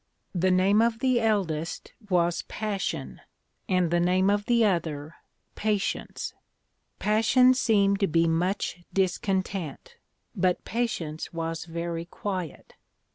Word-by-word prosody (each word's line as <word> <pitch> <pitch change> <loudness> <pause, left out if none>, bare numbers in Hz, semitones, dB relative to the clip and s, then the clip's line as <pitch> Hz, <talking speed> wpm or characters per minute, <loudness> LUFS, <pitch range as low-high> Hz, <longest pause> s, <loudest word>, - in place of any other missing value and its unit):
The 185 0 +2
name 190 +3 +4
of 230 -1 +2
the 255 0 +2
eldest 180 -8 -1 0.2
was 175 -2 +2
Passion, 210 -3 -3 0.5
and 180 -3 +2
the 175 - +3
name 185 +3 +3
of 205 0 0
the 235 -2 +4
other 160 -5 -1 0.4
Patience. 210 -2 -2 0.6
Passion 235 +4 +4
seemed 200 -6 +2
to 195 - +2
be 165 0 +2
much 180 +3 0
discontent; 190 - -2 0.4
but 185 -2 +1
Patience 175 -10 -3
was 165 0 -3
very 170 0 -4
quiet. 185 -3 -5
185 Hz, 115 wpm, -27 LUFS, 170-210 Hz, 0.6 s, name